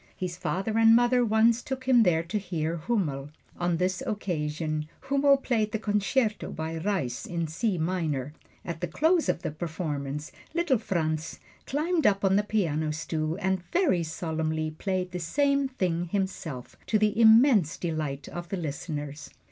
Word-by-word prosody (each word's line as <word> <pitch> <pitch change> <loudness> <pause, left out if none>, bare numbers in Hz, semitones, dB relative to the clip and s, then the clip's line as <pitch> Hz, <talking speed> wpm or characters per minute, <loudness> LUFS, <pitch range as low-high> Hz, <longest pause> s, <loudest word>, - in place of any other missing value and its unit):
His 180 -2 -3
father 195 +5 -1
and 225 0 +7
mother 245 +1 +4
once 225 +1 +3
took 265 -1 -5
him 255 -2 +5
there 165 -6 +3
to 210 +6 -2
hear 170 -4 -2
Hummel. 150 -7 -1 0.3
On 175 -1 +1
this 185 +4 0
occasion 155 -7 -2
Hummel 280 0 +4
played 225 -5 0
the - - +1
Concerto 210 +2 0
by 160 +1 -4
Reis 160 -9 -2
in 170 -1 -2
C 180 +5 -1
minor. 160 -5 -1 0.3
At 170 -2 -5
the 175 - -1
close 320 - +2
of - - 0
the - - -2
performance, 150 -3 -4 0.2
little 335 -8 +2
Franz 160 -6 -2 0.3
climbed 315 +4 +1
up 200 0 +2
on 190 0 +4
the 205 - +4
piano 160 -8 0
stool 155 +1 -2
and 190 0 0
very 340 - +3
solemnly 160 -1 -2
played 185 +2 -2
the 180 - -4
same 280 - +1
thing 180 -9 -1
himself, 175 -8 -4
to 215 - +3
the 215 +1 +2
immense 220 - +6
delight 155 -5 -3
of 175 0 -7
the 195 - -2
listeners. 150 -2 -5
180 Hz, 160 wpm, -27 LUFS, 160-220 Hz, 0.3 s, and